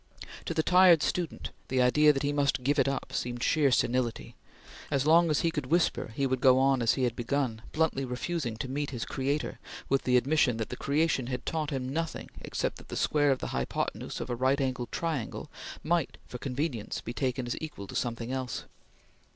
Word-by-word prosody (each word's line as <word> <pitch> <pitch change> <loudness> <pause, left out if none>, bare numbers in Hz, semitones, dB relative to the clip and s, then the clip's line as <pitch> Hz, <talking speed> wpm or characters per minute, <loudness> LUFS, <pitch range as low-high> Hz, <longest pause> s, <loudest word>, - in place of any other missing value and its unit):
To 165 - -3
the 160 - +2
tired 180 -3 +6
student, 175 -3 -2 0.2
the 130 - 0
idea 150 +5 +5
that 135 -1 -2
he 145 0 0
must 140 -3 +1
give 145 +3 +2
it 135 - +3
up 140 - -3
seemed 120 0 -2
sheer 150 -3 +3
senility. 125 -2 0 0.5
As 140 -1 +1
long 165 +2 +5
as 150 - +2
he 165 - +1
could 150 -5 -3
whisper, 165 -7 +1
he 140 - +1
would 130 -1 0
go 130 -1 +6
on 135 -1 +3
as 115 - +3
he 130 - -1
had 120 -2 +1
begun, 120 -2 -1
bluntly 160 -3 +1
refusing 125 -1 -3
to 130 - -4
meet 145 +2 -2
his 120 -4 -4
creator 140 +3 -2 0.3
with 135 0 +3
the 125 -1 +3
admission 130 -2 +2
that 110 - -3
the - - -4
creation 145 -3 +1
had 125 -1 -4
taught 155 -2 -1
him 130 -3 -3
nothing 165 +4 -3
except - - -3
that - - -14
the - - -5
square 145 -1 +2
of 135 - +3
the - - -3
hypothenuse 65 -1 -3
of 125 - -4
a - - 0
right 130 +3 +2
angled 130 -3 -2
triangle 160 -8 -3 0.3
might 170 -1 0
for 125 - -7
convenience 130 -4 -3
be 120 - -6
taken 130 -1 -1
as 120 - -2
equal 150 -11 -6
to - - -10
something 115 0 -2
else. 130 -3 -3
135 Hz, 210 wpm, -29 LUFS, 125-150 Hz, 0.5 s, tired